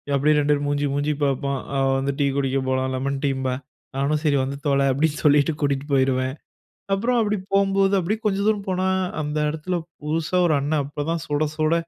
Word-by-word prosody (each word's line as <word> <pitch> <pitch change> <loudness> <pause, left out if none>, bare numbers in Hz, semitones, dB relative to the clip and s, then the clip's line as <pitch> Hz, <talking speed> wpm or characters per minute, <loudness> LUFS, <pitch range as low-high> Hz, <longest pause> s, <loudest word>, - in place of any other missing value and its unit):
அப்படியே 150 +2 +3
2 145 0 +1
பேரும் 145 0 -1
மூஞ்சி, 145 0 0
மூஞ்சி 145 +2 0
பார்ப்போம், 140 0 0 0.2
அவ 135 0 +2
வந்து 135 +1 -1
டீ 140 - +3
குடிக்க 135 -1 0
போலாம், 130 0 0
லெமன் 135 +2 -2
டீம்பா. 130 -2 0 0.4
நானும் 145 +2 0
சரி 145 -3 +3
வந்து 135 +1 -4
தொல 140 -1 +3
அப்டீன்னு 150 +3 0
சொல்லிட்டு 150 +1 +4
கூட்டிட்டு 140 -1 0
போயிருவேன். 130 -1 +2 0.6
அப்புறம் 235 +5 +1
அப்பிடி 210 -1 +1 0.2
போம்போது, 195 0 +3
அப்டீயே 195 +5 -1
கொஞ்சம் 200 0 +1
தூரம் 210 -2 0
போனா, 185 0 0 0.3
அந்த 150 0 -3
இடத்தில 160 +4 -3 0.3
புதுசா 160 +3 -1
ஒரு 160 - +2
அண்ணன் 145 +1 0
அப்ப 145 +1 -5
தான் 165 -1 -1
சுட 150 +1 0
சுட 155 +1 +2
145 Hz, 185 wpm, -23 LUFS, 140-165 Hz, 0.6 s, சொல்லிட்டு